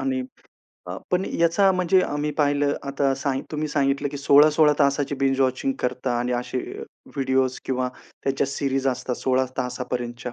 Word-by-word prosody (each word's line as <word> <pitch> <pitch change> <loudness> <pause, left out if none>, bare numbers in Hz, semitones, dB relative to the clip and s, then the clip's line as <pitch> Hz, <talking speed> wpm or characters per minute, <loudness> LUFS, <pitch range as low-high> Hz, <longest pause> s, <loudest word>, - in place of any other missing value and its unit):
आणि 135 -1 -1 0.7
अ, 90 - -5
पण 180 +1 +1 0.2
याचा 170 +4 +4
म्हणजे 185 0 +3
आम्ही 145 -2 -2
पाहिलं 145 -1 +2
आता 140 0 0
सा 135 +1 -2 0.2
तुम्ही 155 0 -2
सांगितलं, 140 -1 0
की 145 - -6
16-16 150 +2 +5
तासाची 140 0 +1
बिंज-वॉचिंग 135 - +1
करता 125 -1 -1
आणि 125 +1 -1
असे 125 +1 -4 0.2
अ, - - -6 0.3
व्हिडिओज् 130 -1 +1
किंवा 130 -1 -1 0.4
त्याच्या 135 0 +1
सीरीज 135 -1 -1
असतात 125 0 -2
16 130 0 +1
तासापर्यंतच्या 125 -1 -4
135 Hz, 150 wpm, -24 LUFS, 130-145 Hz, 0.7 s, 16-16